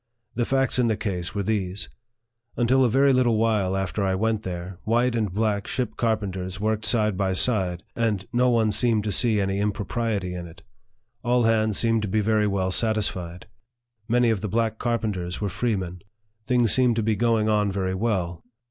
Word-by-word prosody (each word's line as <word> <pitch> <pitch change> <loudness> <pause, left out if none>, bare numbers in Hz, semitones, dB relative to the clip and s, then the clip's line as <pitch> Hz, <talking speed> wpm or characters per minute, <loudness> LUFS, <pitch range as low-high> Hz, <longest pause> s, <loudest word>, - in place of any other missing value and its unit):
The 120 0 -1
facts 135 0 +1
in 120 - +3
the 110 -2 0
case 95 -4 -4
were 100 - -1
these: 100 -2 -2 0.7
Until 130 +2 +3
a 125 - +3
very 135 +3 +4
little 120 -3 +3
while 105 -4 +1
after 95 +1 -2
I 95 -1 +1
went 110 +2 0
there, 90 -1 -6
white 120 +2 +1
and 110 -4 -1
black 105 0 -1
ship 120 -4 -2
carpenters 95 -5 -2
worked 110 +1 -1
side 105 -4 +2
by 95 0 0
side, 95 -4 +1
and 110 -5 -1
no 125 +1 +3
one 115 -3 +2
seemed 115 -1 +1
to 105 - -2
see 110 +1 +3
any 95 0 -1
impropriety 105 -2 -2
in 90 -1 -6
it. 85 0 -15 0.6
All 125 0 +2
hands 110 -2 +2
seemed 115 -1 +2
to 105 - -2
be 110 +3 0
very 105 0 +2
well 95 -2 -1
satisfied. 95 -5 0 0.6
Many 120 0 +3
of 105 -4 -1
the 105 - -3
black 110 +1 -1
carpenters 105 -7 -2
were 105 - -2
freemen. 95 -5 -2 0.5
Things 120 -4 +3
seemed 125 -3 +3
to 115 - 0
be 110 0 +1
going 115 -1 +1
on 105 -2 +2
very 95 -1 -2
well. 95 -5 -2
110 Hz, 185 wpm, -24 LUFS, 95-115 Hz, 0.7 s, very